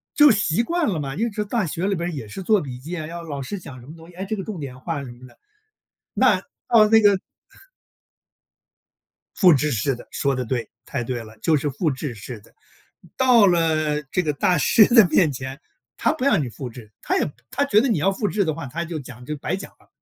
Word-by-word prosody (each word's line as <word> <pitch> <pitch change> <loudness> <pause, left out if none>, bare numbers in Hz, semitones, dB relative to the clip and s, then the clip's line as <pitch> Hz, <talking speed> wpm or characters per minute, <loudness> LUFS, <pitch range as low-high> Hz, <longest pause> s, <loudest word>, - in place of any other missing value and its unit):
就 295 -2 +7
习 205 -1 +1
惯 340 +3 0
了 175 -6 -1
嘛， 135 -1 -4
因 225 +6 0
为 210 0 -3
大 220 -1 -1
学 170 +5 -3
里 200 - +1
边 170 +1 -3
儿 - - -6
也 135 -8 -6
是 105 - -7
做 210 0 +3
笔 125 -3 -7
记 170 +6 -6
啊， 155 - -4
要 170 +1 -7
老 145 -4 -5
师 200 +8 -5
讲 130 -6 -11
什 - - -14
么 155 - -10
东 165 +1 -14
西， 175 - -17
哎， 190 +2 -5
这 215 +2 -2
个 195 - -5
重 210 -7 -6
点 130 -3 -7
画 150 0 -4
什 125 - -8
么 125 +1 -13
的。 - - -21 0.8
那 - - +4 0.3
到 215 -2 +6
那 220 +1 +6
个 205 -2 +5 2.2
复 180 -4 +6
制 150 +1 +1
式 120 +3 0
的 - - -13
说 140 -1 0
得 125 -1 -3
对， 115 -2 -3 0.2
太 120 - -3
对 120 -1 -4
了， 110 0 -14
就 155 +5 +3
是 145 +1 -2
复 150 +4 -1
制 130 0 -5
式 110 +2 -8
的， 100 - -22 0.6
到 245 -6 +6
了 155 -3 +1
这 180 - +1
个 150 -3 -1
大 175 +4 +2
师 215 - +5
的 220 -7 +8
面 160 -6 +3
前， 130 +2 -7 0.4
他 - - +2
不 310 -5 -5
让 210 - +3
你 130 - -3
复 125 +2 -7
制， 115 -3 -13
他 - - 0
也 145 - 0 0.2
他 270 +2 0
觉 215 -5 +4
得 270 - +1
你 220 - +1
要 195 +6 +2
复 205 +2 -2
制 205 0 +1
的 155 - 0
话， 165 -3 -7
他 170 +6 -4
就 165 -2 -5
讲 125 -2 -11
就 150 +3 -4
白 170 +6 -2
讲 195 - -9
了。 - - -26
160 Hz, 265 characters per minute, -22 LUFS, 135-200 Hz, 2.2 s, 的